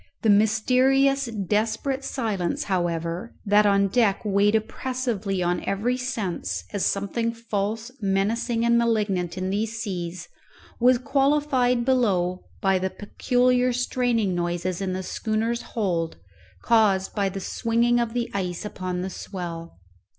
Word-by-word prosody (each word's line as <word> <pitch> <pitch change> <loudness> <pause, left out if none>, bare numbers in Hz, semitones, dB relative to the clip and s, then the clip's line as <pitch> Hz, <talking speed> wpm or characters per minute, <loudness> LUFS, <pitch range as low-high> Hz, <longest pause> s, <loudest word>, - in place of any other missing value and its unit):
The 220 - +5
mysterious 255 +6 +3
desperate 220 +6 -1
silence, 210 -11 -2
however, 175 +2 -2
that 205 +1 +5
on 200 0 +3
deck 205 -1 +2
weighed 205 +1 +3
oppressively 220 -4 -2
on 175 0 0
every 220 +6 0
sense, 245 -8 -3
as 205 - -1
something 215 +4 0
false, 225 0 -3
menacing, 225 +4 0
and 235 0 +4
malignant 205 -7 0
in 185 0 -2
these 220 +3 -2
seas, 180 -5 -4 0.5
was 250 +1 +5
qualified 270 -2 +2
below 190 -9 +1 0.2
by 190 -1 +3
the 190 +1 -1
peculiar 250 +5 +1
straining 245 -4 0
noises 175 +1 -2
in 190 -1 -1
the 185 +1 -3
schooner's 225 +4 -1 0.2
hold 170 -6 -1 0.5
caused 210 -5 +3
by 200 -2 0
the 195 +1 -5
swinging 235 +4 +1
of 235 -1 -1
the 240 -1 0
ice 180 -1 -3
upon 185 -3 -4
the 190 - -3
swell. 170 -3 -7
210 Hz, 130 wpm, -25 LUFS, 190-240 Hz, 0.5 s, The